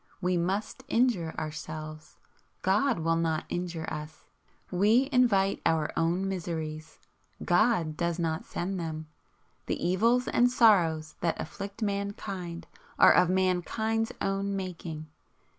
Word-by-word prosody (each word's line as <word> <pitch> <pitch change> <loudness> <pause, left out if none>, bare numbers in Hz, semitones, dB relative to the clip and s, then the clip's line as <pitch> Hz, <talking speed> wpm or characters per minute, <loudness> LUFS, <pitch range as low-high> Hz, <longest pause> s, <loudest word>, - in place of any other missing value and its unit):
We 180 -1 0
must 195 +8 -2
injure 230 -11 +1
Ourselves. 155 0 -6 0.5
God 215 +8 +2
will 165 0 +1
not 160 -1 0
injure 175 -2 -3
us. 150 +1 -7 0.5
We 215 +8 +4
invite 205 -7 +3
our 160 -2 +1
own 170 +4 +1
miseries. 160 -4 -4 0.5
God 175 -4 +2
does 170 0 -1
not 160 -2 -1
send 185 +2 -4
them. 155 -2 -5 0.6
The - - -1
evils 230 +7 +2
and 245 +1 +4
sorrows 170 -10 +3
that 170 -1 0
afflict 200 +6 -6
mankind 200 -4 -4 0.3
are - - +8
of 180 -1 +4
mankind's 190 +5 0
own 195 0 -1
making. 170 -4 -5
180 Hz, 120 wpm, -29 LUFS, 160-200 Hz, 0.6 s, are